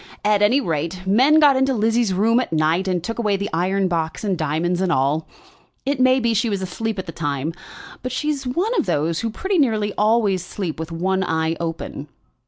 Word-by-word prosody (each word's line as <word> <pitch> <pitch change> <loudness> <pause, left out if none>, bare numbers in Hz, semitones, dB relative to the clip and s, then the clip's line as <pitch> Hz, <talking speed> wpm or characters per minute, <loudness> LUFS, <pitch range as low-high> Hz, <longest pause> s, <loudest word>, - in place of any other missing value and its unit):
At 210 -1 +3
any 225 +7 +4
rate, 170 - -3
men 260 +11 +5
got 290 -3 +6
into 265 0 +2
Lizzie's 225 0 +1
room 220 +6 +3
at 255 - -3
night 160 +4 +1
and 180 -3 -1
took 230 +4 -4
away 210 -4 +1
the 200 +1 -4
iron 190 +3 +1
box 165 -1 -2
and 200 -3 0
diamonds 165 +3 -1
and 185 -2 +1
all. 140 +3 +1 0.6
It 280 0 -1
may 255 +1 +4
be 235 -2 +1
she 225 +2 +1
was 200 -2 -2
asleep 220 +4 -3
at 190 - -4
the 165 - -6
time; 145 -1 -3 0.5
but 255 - -4
she's 275 0 -2
one 360 - 0
of - - -1
those 165 0 0
who 230 - -2
pretty 380 - -1
nearly 215 -7 +1
always 210 -4 +2
sleep 180 -3 -5
with 160 +1 -5
one 190 +3 0
eye 160 -1 0
open." 165 -3 -5
195 Hz, 205 wpm, -21 LUFS, 165-235 Hz, 0.6 s, got